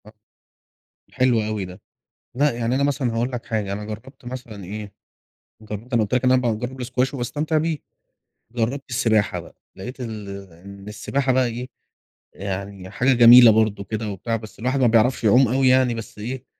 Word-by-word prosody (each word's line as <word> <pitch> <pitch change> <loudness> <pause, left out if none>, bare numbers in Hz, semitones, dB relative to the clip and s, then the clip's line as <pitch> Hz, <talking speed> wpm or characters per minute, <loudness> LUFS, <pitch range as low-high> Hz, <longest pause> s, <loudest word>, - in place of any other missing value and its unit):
آه، 105 - -15 1.0
حلو 125 -3 +2
أوي 105 -2 -3
ده. 90 +2 -10 0.6
لأ 145 +3 +3
يعني 120 +1 -1
أنا 140 - +1
مثلًا 135 -4 0
هاقول 120 +3 -1
لك 125 -2 -5
حاجة. 105 -3 -2
أنا 105 +1 -5
جرّبت 110 +5 -10
مثلًا 120 -5 -8
إيه 100 +2 -7 0.7
أنا 110 +3 -2
قلت 105 - -5
لك 125 0 +2
إن 125 - +4
أنا 130 0 +4
باجرب 125 +2 -3
الSquash 125 +2 -1
وباستمتع 150 +5 -1
بيه. 160 0 0 0.8
جرّبت 125 +4 -2
السباحة 110 -3 +1
بقى، - - -15 0.2
لقيت 125 +7 -8
إن 110 -4 -6 0.2
إن 100 +4 -12
السباحة 130 +5 -1
بقى 130 0 +3
إيه، 120 +2 -5 0.7
يعني 100 0 -6
حاجة 130 +6 +2
جميلة 120 -1 +9
برضو 110 -2 +1
كده 110 +2 -4
وبتاع، 100 +4 -3
بس 110 -1 -9
الواحد 130 +4 0
ما 130 - +4
بيعرفش 120 +3 +3
يعوم 120 +5 +5
أوي 130 +3 +2
يعني. 130 -1 +4
بس 115 -1 -8
إيه، 125 +4 -5
115 Hz, 175 wpm, -22 LUFS, 105-130 Hz, 1.0 s, جميلة